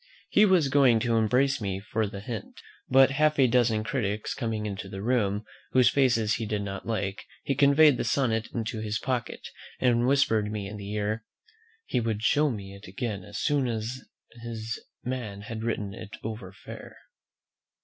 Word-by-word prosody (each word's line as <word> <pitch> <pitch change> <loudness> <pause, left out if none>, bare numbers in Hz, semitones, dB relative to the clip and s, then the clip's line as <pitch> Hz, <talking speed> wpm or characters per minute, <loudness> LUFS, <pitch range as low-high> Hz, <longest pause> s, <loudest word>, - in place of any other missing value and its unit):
He 210 - +5
was 185 -7 +4
going 130 -4 +5
to 115 0 +1
embrace 125 +5 +2
me 95 -2 -2
for 110 +2 -1
the 100 -1 -7
hint; 115 -1 -7 0.3
but 135 +1 +6
half 155 +2 +2
a 135 - +6
dozen 115 -3 +2
critics 105 -3 -2
coming 110 -4 -3
into 100 -1 -5
the 95 0 -6
room, 110 -3 +1 0.3
whose 125 -2 +6
faces 120 -6 +2
he 115 -2 -4
did 105 -1 -1
not 100 0 -6
like, 100 -3 -2 0.2
he 140 - 0
conveyed 140 +1 +5
the - - -1
sonnet 115 -2 0
into 110 -1 -3
his 110 0 -2
pocket, 125 0 -3 0.3
and 120 -1 +3
whispered 110 -6 +2
me 105 -2 -4
in 105 +1 -7
the 100 0 -7
ear, 105 +1 -2 0.6
"he - - 0
would 110 -2 -2
show 150 +6 +4
it - - 0
me 100 -2 -7
again 100 0 -4
as 105 +2 -8
soon 145 -3 +1
as 115 +2 -3 0.4
his 115 -1 -5 0.2
man 120 -6 -4
had 110 +1 -6
written 105 -4 -2
it 110 -1 -9
over 110 -4 -6
fair." 100 - -11
110 Hz, 180 wpm, -27 LUFS, 105-125 Hz, 0.6 s, but